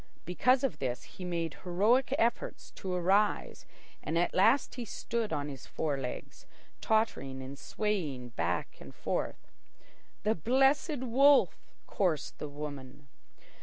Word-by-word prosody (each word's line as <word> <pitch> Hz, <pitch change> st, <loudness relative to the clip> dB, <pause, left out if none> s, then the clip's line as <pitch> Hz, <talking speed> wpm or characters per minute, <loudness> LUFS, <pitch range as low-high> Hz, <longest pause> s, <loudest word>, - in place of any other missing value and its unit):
Because 250 Hz, +9 st, +3 dB
of 270 Hz, -, -1 dB
this 125 Hz, -2 st, -2 dB
he 185 Hz, -, -11 dB
made 170 Hz, -3 st, -2 dB
heroic 210 Hz, +9 st, +3 dB
efforts 240 Hz, -, -1 dB
to 190 Hz, -, -6 dB
arise 190 Hz, +4 st, +1 dB, 0.3 s
and 160 Hz, +2 st, -2 dB
at 175 Hz, -, +1 dB
last 225 Hz, +9 st, +4 dB
he 245 Hz, -, -5 dB
stood 230 Hz, 0 st, -3 dB
on 145 Hz, 0 st, -1 dB
his 135 Hz, -3 st, -8 dB
four 150 Hz, -3 st, -1 dB
legs, 130 Hz, -2 st, -6 dB, 0.3 s
tottering 215 Hz, -12 st, 0 dB
and 135 Hz, +2 st, -7 dB
swaying 150 Hz, -, -2 dB
back 90 Hz, -5 st, -2 dB
and -, -, -11 dB
forth. -, -, -3 dB, 0.7 s
"The 215 Hz, -, +3 dB
Blessed 270 Hz, -, +2 dB
Wolf!" 270 Hz, +3 st, +5 dB, 0.3 s
chorused 170 Hz, -7 st, -1 dB
the 150 Hz, -, -5 dB
women. 145 Hz, -1 st, -8 dB
180 Hz, 130 wpm, -31 LUFS, 145-235 Hz, 0.7 s, Wolf